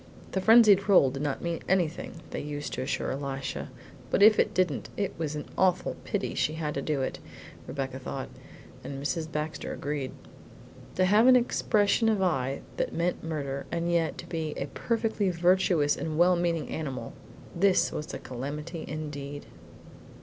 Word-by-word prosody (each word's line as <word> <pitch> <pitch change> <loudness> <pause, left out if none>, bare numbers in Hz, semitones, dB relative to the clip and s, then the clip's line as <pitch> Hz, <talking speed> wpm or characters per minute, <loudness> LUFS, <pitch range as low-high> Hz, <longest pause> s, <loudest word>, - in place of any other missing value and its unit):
The 190 - -1
frenzied 210 -2 +6
roll 140 -9 +6
did 135 +1 -5
not 145 -2 -2
mean 170 -1 -2
anything, 170 -2 -1
they - - -3
used 145 0 -5
to - - -3
assure 130 -1 -2
Elisha; 135 0 -4 0.4
but - - +3
if 215 0 +7
it - - +3
didn't, 180 -7 0
it 200 - -1
was 155 -2 -2
an 150 - -4
awful 185 -1 +2
pity - - -2
she 155 - 0
had 155 -2 -3
to 140 - -2
do 140 -2 -1
it, - - -3 0.5
Rebecca 135 -1 -4
thought; 130 0 -5 0.5
and 135 -1 -6
Mrs. 160 +3 -2
Baxter 150 -1 -3
agreed. 145 -3 -3 0.8
To 185 - +3
have 210 +6 +5
an 260 - +8
expression 225 -2 +2
of 215 -2 +2
eye 135 -8 0 0.2
that - - -1
meant 170 +2 -1
murder, 140 -4 -4
and 170 0 -1
yet 165 -3 +1
to - - -8
be 160 -3 -3
a - - -2
perfectly 225 -4 0
virtuous 175 -3 +3
and 155 -1 -3
well 180 +2 +5
meaning 170 -3 -1
animal, 130 -7 -4 0.4
this 185 +2 +3
was 150 - -5
a - - -4
calamity 150 +6 -6
indeed. 145 -2 -6
160 Hz, 170 wpm, -28 LUFS, 140-185 Hz, 0.8 s, an